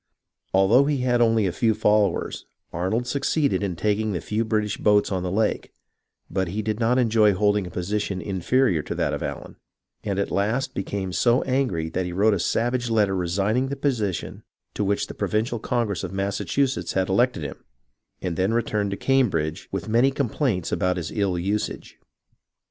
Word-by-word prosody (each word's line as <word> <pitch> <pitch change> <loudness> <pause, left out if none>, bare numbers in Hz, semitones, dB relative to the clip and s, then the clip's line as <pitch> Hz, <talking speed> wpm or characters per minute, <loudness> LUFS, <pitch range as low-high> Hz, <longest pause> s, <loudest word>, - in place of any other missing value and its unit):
Although 100 +8 +5
he 145 -1 +1
had 120 -1 +2
only 115 -2 +3
a 95 - +1
few 110 +5 +1
followers, 105 -3 +1 0.3
Arnold 95 +7 0
had - - -13
succeeded 140 - +1
in 95 -4 -2
taking 105 +4 0
the 90 - -1
few 110 +7 -1
British 105 -2 -1
boats 105 -1 +3
on 95 -2 -1
the 90 - -2
lake; 110 +2 0 0.6
but 95 0 -1
he 105 +5 -3
did 110 +1 -2
not 120 +2 +2
enjoy 110 -4 +4
holding 105 0 +1
a - - -7
position 95 +2 -2
inferior 95 - +1
to - - -5
that - - 0
of - - -3
Allen, - - -6 0.5
and 100 -2 -2
at 100 - -1
last 120 +7 0
became 95 -1 -3
so 120 +4 +3
angry 125 -12 0
that 90 +3 -2
he 90 - -5
wrote 105 +4 +3
a 100 - 0
savage 120 +6 0
letter 105 -4 +2
resigning 100 +8 0
the 140 - -3
position 115 - -2 0.3
to 105 - -2
which 100 0 0
the - - -9
Provincial 110 +2 -1
Congress 115 -5 -1
of - - -4
Massachusetts 100 +8 -1
had 95 -1 +1
elected 120 -2 +1
him, 70 - -7 0.6
and 90 -3 -2
then 95 +5 +1
returned 105 -3 0
to 100 - -3
Cam 135 -3 +3
bridge 80 0 -3
with 95 +1 -4
many 120 +5 +4
complaints 130 - -1
about 90 0 0
his 85 -1 -4
ill 100 -4 0
usage. 100 +4 -3
105 Hz, 185 wpm, -24 LUFS, 95-120 Hz, 0.6 s, Although